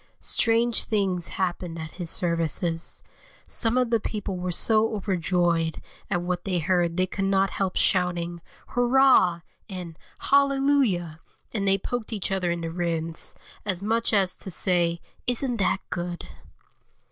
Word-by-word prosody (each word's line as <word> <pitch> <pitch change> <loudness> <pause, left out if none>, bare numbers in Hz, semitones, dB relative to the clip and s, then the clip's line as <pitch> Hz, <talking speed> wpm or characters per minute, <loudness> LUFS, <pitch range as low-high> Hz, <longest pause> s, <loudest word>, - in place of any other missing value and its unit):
Strange 230 +1 +2
things 190 -5 0
happened 180 -2 -3
at 160 -1 -6
his 175 -3 -4
services; 165 0 0 0.4
some 230 +1 +1
of 250 -2 +2
the 230 - +4
people 205 -2 -4
were 180 0 -2
so 220 +4 +2
overjoyed 175 -4 0 0.3
at 175 -3 0
what 180 0 -2
they 185 -2 -1
heard 175 0 +1
they 185 - +3
could 195 +1 -3
not 195 0 +2
help 190 -2 -1
shouting 175 -2 +1 0.3
"Hurrah!" 245 -8 +4 0.3
and 180 -4 -7 0.2
"Hallelujah!" 275 - +2 0.3
and 200 -3 -1
they 195 0 +4
poked 240 +3 -4
each 205 -3 -2
other 190 -2 0
in 170 0 -1
the 165 0 -3
ribs, 165 -1 -3 0.3
as 195 -2 -3
much 230 +2 +1
as 195 -4 +2
to - - -7
say: 170 -1 +1 0.3
"Isn't 245 0 0
that 195 -1 +1
good?" 175 0 -4
185 Hz, 145 wpm, -26 LUFS, 175-215 Hz, 0.4 s, the